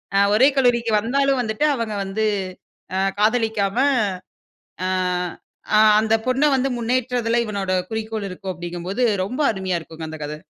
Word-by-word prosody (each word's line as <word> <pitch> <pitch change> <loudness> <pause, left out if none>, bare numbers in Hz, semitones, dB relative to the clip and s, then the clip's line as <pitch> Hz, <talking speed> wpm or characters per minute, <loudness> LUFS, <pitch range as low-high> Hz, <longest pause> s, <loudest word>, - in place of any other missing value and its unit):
அ - - +5 0.2
ஒரே 255 +5 +6
கல்லூரிக்கு 240 -3 +2
வந்தாலும் 275 +4 +1
வந்துட்டு 220 +4 -1
அவங்க 230 -4 -3
வந்து 195 +3 -2 0.7
அ 190 - +1 0.2
காதலிக்காம 220 -2 +1 1.1
அ - - 0 0.9
அ - - +6 0.2
அந்த 220 0 +1
பொண்ணை 260 +3 +2
வந்து 265 +1 0
முன்னேற்றதில 240 -1 0
இவனோட 200 -3 -2 0.2
குறிக்கோள் 220 -2 -3
இருக்கும் 185 +1 -5
அப்படிங்கும்போது 175 +6 -4 0.2
ரொம்ப 250 +8 -5
அருமையா 190 -3 -2
இருக்குங்க 160 0 -9
அந்த 160 - -7
கதை. 150 +1 -5
220 Hz, 135 wpm, -21 LUFS, 195-245 Hz, 1.1 s, ஒரே